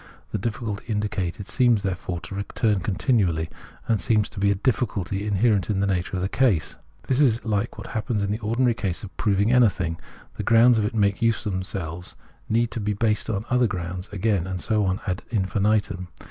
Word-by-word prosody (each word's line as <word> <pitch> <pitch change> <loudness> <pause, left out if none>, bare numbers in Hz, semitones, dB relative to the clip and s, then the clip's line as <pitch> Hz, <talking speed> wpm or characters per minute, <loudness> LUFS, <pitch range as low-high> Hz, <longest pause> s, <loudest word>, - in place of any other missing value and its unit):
The - - -1
difficulty 105 0 -3
indicated 105 -3 -2
seems 120 -5 +3
there 95 -2 0
fore 90 -1 -5
to 90 - -9
recur 105 +3 0
continually, 95 - +1 0.4
and 110 -3 +1
seems 110 -2 +2
to 105 - -8
be 100 +1 +3
a 100 - +3
difficulty 105 -4 -1
inherent 105 0 +2
in 100 -2 +1
the 100 - +2
nature 95 -1 -1
of 90 - -2
the - - +1
case. 105 - +1 0.3
This 130 - 0
is 120 -6 +3
like 110 +1 -1
what 105 - -7
happens 110 -2 -2
in 100 - -1
the 105 - -2
ordinary 120 +3 +1
process 100 -6 -3
of 100 - -9
proving 105 +1 +2
anything; 95 -10 +3 0.4
the - - -2
grounds 115 0 +5
it 105 +2 -1
makes 100 -2 +2
iise 115 +1 +1
of 105 - -1
themselves 90 -2 -5 0.3
need 115 +1 +2
to 115 - -4
be 105 0 -1
based 105 +1 0
on 105 -1 -2
other 125 -1 +4
grounds 90 -1 -5
again, 100 -3 0
and 95 -1 -3
so 105 +3 +1
on 95 +2 -1
ad 90 -2 -2
infinitum. 100 -3 0
105 Hz, 200 wpm, -24 LUFS, 95-115 Hz, 0.4 s, grounds